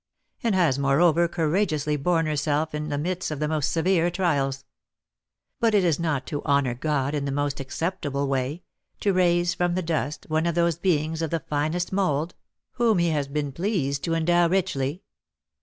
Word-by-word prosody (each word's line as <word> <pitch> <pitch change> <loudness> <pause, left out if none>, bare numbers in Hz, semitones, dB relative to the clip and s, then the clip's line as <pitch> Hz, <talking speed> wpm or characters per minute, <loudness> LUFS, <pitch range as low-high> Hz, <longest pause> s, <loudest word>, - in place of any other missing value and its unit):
and 225 -4 +1
has, 160 -8 +2
moreover, 160 +5 +3
courageously 155 -2 0
borne 165 +3 +1
herself 150 +1 0
in 150 0 -3
the 145 - -1
midst 180 +5 -2
of 155 -2 -4
the 150 - 0
most 155 -2 0
severe 175 0 +2
trials. 140 -7 -1 0.9
But 230 -3 +3
is 175 -6 +3
it - - -3
not 150 -6 -1
to 145 -1 -4
honour 140 -4 +2
God 140 +1 -1
in 145 -2 -1
the 140 - -2
most 145 0 -1
acceptable 140 -1 -2
way, 135 +5 -2 0.4
to 200 - +2
raise 175 -1 +2
from 175 -1 0
the 185 - -1
dust 160 -2 -2
one 155 +2 0
of 170 - -1
those 170 -1 +1
beings 160 -3 0
of 160 - -1
the 165 - -1
finest 155 +6 -2
mould, 170 -4 0 0.4
whom 235 -4 +2
he 170 -1 +2
has 145 -3 -1
been 145 0 -2
pleased 145 -5 -1
to 165 -1 0
endow 175 +1 +3
richly? 175 -4 -1
160 Hz, 180 wpm, -25 LUFS, 145-175 Hz, 0.9 s, moreover